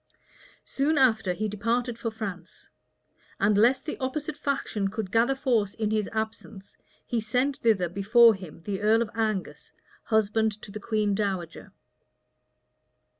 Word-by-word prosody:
Soon 295 +3 0
after 225 -7 +3
he 215 +4 -2
departed 230 +4 -1
for 230 0 -3
France; 195 -6 -8 0.7
and 205 +1 +3
lest 245 +6 +3
the 305 - -5
opposite 290 +3 -3
faction 245 -9 -2
should 215 -3 -4
gather 235 +5 +3
force 235 -7 0
in 215 -1 -1
his 215 -2 0
absence, 220 -2 -6 0.3
he 235 -2 -1
sent 250 +6 0
thither 210 -6 +2
before 220 +6 +5
him 180 -4 -10
the 200 0 -4
earl 220 +2 +4
of 215 - -9
Angus, 215 -4 -3 0.3
husband 220 -1 +1
to 200 - -9
the 215 - -6
queen 210 -1 0
dowager. 190 -5 -3
220 Hz, 140 wpm, -27 LUFS, 200-235 Hz, 0.7 s, before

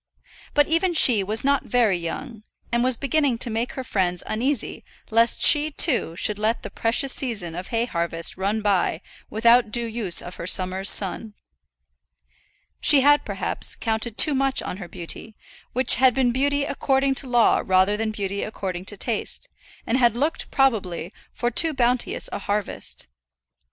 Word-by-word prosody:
But 290 0 +4
even 335 +2 +1
she 235 -9 +6
was 215 +3 -1
not 280 0 +1
very 235 -6 +2
young, 205 +7 -6 0.3
and 235 0 +1
was 255 -1 +1
beginning 280 -2 0
to 235 0 -1
make 230 +3 -3
her 260 - -5
friends 180 -6 -1
uneasy 250 +3 -2 0.3
lest 230 +1 +3
she, 300 0 +5
too, 270 - 0
should 210 +3 -1
let 220 +2 -1
the - - -7
precious 245 +4 +1
season 210 -11 -1
of 180 +3 -6
hay 230 0 -1
harvest 170 -5 -2
run 205 +3 -2
by 195 -4 0 0.3
without 235 +1 +4
due 235 +2 -2
use 220 -6 -1
of 175 - -8
her 170 - -6
summer's 185 +1 +1
sun. 205 +2 -1 1.4
She 285 -3 +6
had, 290 +2 +4
perhaps, - - -2
counted 225 0 -3
too 305 - +5
much 270 0 0
on - - -5
her 185 -3 -8
beauty, 175 +6 -7 0.4
which 255 +2 +3
had 255 -1 +4
been 260 -2 +2
beauty 285 +3 0
according 270 -1 0
to 265 - -11
law 240 -2 +3
rather 190 +2 +2
than 220 +1 -2
beauty 200 -2 -4
according 185 -4 -5
to 205 - -5
taste, 225 +1 -3 0.4
and 245 +4 0
had 240 -2 +3
looked, 300 +5 -1
probably, 200 - 0 0.2
for 240 0 -2
too 315 +5 +2
bounteous 245 -1 0
a - - -4
harvest. 205 - -4
230 Hz, 165 wpm, -23 LUFS, 200-265 Hz, 1.4 s, she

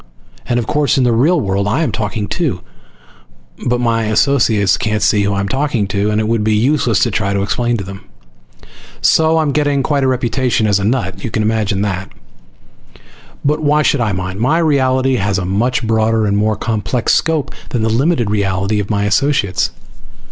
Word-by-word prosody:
And 120 - 0
of 120 - -1
course 150 +2 +1
in 130 - +3
the 120 - +2
real 155 +10 +3
world 100 -3 -1
I 130 +11 +1
am - - -1
talking 105 -1 -3
too, 135 - -2 1.1
but 120 0 +1
my 115 -2 0
associates 110 -4 +2
can't 105 -1 -1
see 105 0 +3
who 100 0 0
I'm 100 0 -1
talking 130 -2 -1
to, 100 +2 0
and 105 0 0
it 110 - -1
would 115 -1 0
be 110 0 +1
useless 120 -1 +1
to 120 - +2
try 100 -2 -1
to 100 0 0
explain 120 +3 -1
to 100 - -5
them. 95 +1 -9 1.0
So 160 0 +3
I'm 155 -3 +1
getting 145 -1 +1
quite 145 -2 0
a - - +2
reputation 125 -2 0
as 100 -2 +2
a - - -3
nut! 100 -5 -1
Can 115 - -5
you - - +1
imagine 105 -3 0
that? 95 -2 -3 1.3
But 150 +2 +1
why 150 0 +2
should 140 -3 +1
I 110 -2 0
mind? 95 0 -4
My 130 +8 +2
reality 130 -5 +2
has 100 -2 0
a 95 - -2
much 115 +6 0
broader 110 0 +1
and 100 -1 0
more 105 +1 +1
complex 115 +2 -1
scope 160 -3 0 0.2
than 120 -3 -1
the - - +1
limited 120 -1 +1
reality 100 0 0
of 100 - -4
my 100 -2 0
associates. 105 -2 +1
110 Hz, 195 wpm, -16 LUFS, 100-130 Hz, 1.3 s, in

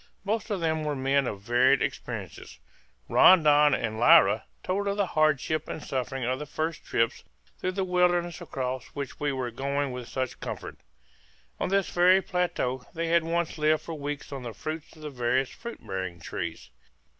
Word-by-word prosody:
Most 220 +3 -1
of 200 -4 -2
them 160 -1 0
were 150 -1 -1
men 135 0 +1
of 100 -4 -5
varied 125 +5 +4
experiences. - - -6 0.5
Rondon 150 -5 +6
and 110 -1 -3
Lyra 105 -2 +6 0.2
told 200 +2 -1
of 200 0 -1
the 200 - +2
hardship 155 -1 +1
and 155 - -6
suffering 130 0 -3
of 130 +2 -1
the 150 - -6
first 160 +2 -3
trips 115 0 0 0.4
through 185 - -2
the 195 0 -1
wilderness 175 -2 +1
across 130 -1 -4
which 140 -2 -5
we 145 -1 0
were 130 -3 -3
going 140 +3 -2
with 125 -1 -6
such 130 -1 -3
comfort. - - -6 0.8
On - - -1
this 195 -1 +1
very 180 +2 +5
plateau 175 -9 -1
they 165 0 -2
had 170 0 +4
once 165 -1 -2
lived 155 0 +2
for 165 - -6
weeks 145 -1 -5
on 135 -2 -5
the 120 -2 -6
fruits 155 +9 -6
of 155 - -14
the 150 - -5
various 125 +1 0
fruit 235 +1 -9
bearing 95 -3 -4
trees. 65 -4 -6
145 Hz, 180 wpm, -27 LUFS, 130-170 Hz, 0.8 s, Rondon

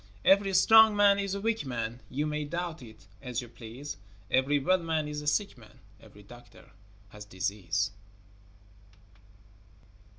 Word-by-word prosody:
Every 195 0 +4
strong 220 +3 +7
man 200 -1 +4
is 200 -1 -2
a - - -3
weak 225 +1 -1
man, 120 -3 -4
You 145 +3 -2
may 150 0 -2
doubt 170 +1 -5
it 110 -5 -14 0.2
as 125 -3 -4
you 125 - -7
please, 120 +5 -9 0.3
Every 135 +3 +2
well 185 +7 +2
man 160 -3 -2
is 150 0 -5
a 150 - -8
sick 175 - -1
man, 105 -2 -18 0.2
Every 105 - -16
doctor 120 +4 -16 0.4
has 105 0 -11
disease. 100 0 -2
145 Hz, 145 wpm, -29 LUFS, 115-185 Hz, 0.4 s, strong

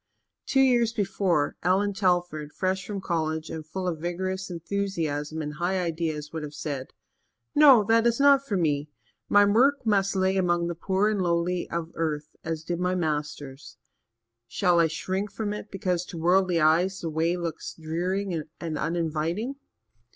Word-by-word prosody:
Two 270 - +3
years 240 -3 +3
before, 190 -7 0
Allan 195 +3 +2
Telford, 175 -6 0
fresh 185 0 -1
from 200 -2 -4
college 160 -3 -2
and 160 - -5
full 185 +4 -5
of 165 -3 -2
vigorous 185 +3 -3
enthusiasm 165 -4 -3
and 150 0 -5
high 175 +4 -1
ideas, 160 -3 -3
would 160 - -3
have 150 -1 -7
said: 140 -4 -4 0.7
"No, 275 -7 +7
that 225 +2 +3
is 235 +1 +1
not 280 -1 +6
for 210 -8 -2
me. 150 -3 0 0.4
My 205 0 +6
work 255 +7 +3
must 200 -2 +2
lie 190 0 +2
among 175 -3 +1
the 170 - -2
poor 190 +4 0
and 205 -3 -1
lowly 175 0 0
of 170 -1 -4
earth 150 -2 -3
as 160 -1 -4
did 175 +1 -3
my 180 +1 0
Master's. 150 -4 -4 0.7
Shall 175 - +2
I 165 - +5
shrink 190 +6 -3
from 210 -2 -3
it 210 0 -7
because, 180 -2 -1
to 170 - -8
worldly 180 +1 +3
eyes, 175 +5 +3
the 165 - -3
way 165 +3 +1
looks 165 -2 -5
dreary 175 +2 -2 0.2
and 160 -3 -4
uninviting?" 165 - -1
175 Hz, 165 wpm, -26 LUFS, 160-195 Hz, 0.7 s, No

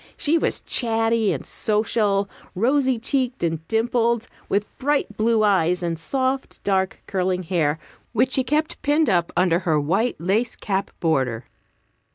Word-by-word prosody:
She 305 +3 +2
was 330 - 0
chatty 225 -2 +2
and - - -4
social, 210 -2 0 0.3
rosy 260 +5 +2
cheeked 255 0 -1
and 165 -1 -2
dimpled, 235 0 +1 0.2
with 205 +1 +1
bright 280 -6 0
blue 220 0 +2
eyes 180 -3 +2
and 165 -1 -2
soft, 260 +7 -2
dark, 190 -1 0
curling 185 -1 -1
hair, 160 -4 0 0.3
which 250 +3 +1
she 265 - +2
kept 305 +3 -1
pinned 295 -3 +2
up 175 -2 +1
under 175 -1 +3
her 160 -4 +1
white 190 +12 0
lace 210 +8 0
cap 195 -2 -2
border. 130 -8 0
215 Hz, 145 wpm, -22 LUFS, 180-245 Hz, 0.3 s, under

